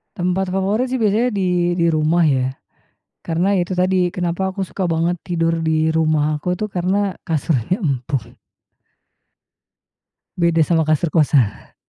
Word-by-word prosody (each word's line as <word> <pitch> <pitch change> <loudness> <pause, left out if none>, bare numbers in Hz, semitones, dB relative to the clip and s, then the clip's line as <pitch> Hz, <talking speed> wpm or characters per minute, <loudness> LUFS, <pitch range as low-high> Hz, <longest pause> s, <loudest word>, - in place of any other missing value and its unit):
Tempat 180 +2 -1
favorit 195 +7 0
sih 260 - -2
biasanya 225 +1 +2
di 180 -5 0
di 170 -1 +1
rumah 160 +2 +2
ya. 130 -4 +2 0.7
Karena 175 +4 0
ya 180 -3 +1
itu 185 - -3
tadi, 185 0 +2
kenapa 175 +1 -1
aku 195 - -2
suka 185 0 -3
banget 170 +1 0
tidur 165 -1 -1
di 160 0 +1
rumah 155 -2 +1
aku 180 +3 -1
tuh 215 +1 -4
karena 190 +2 0 0.2
kasurnya 160 - -1
empuk. 130 -4 -3 2.0
Beda 170 -2 +2
sama 165 -2 +2
kasur 155 +2 +1
kosan. 140 -9 +1
175 Hz, 140 wpm, -19 LUFS, 155-185 Hz, 2.0 s, biasanya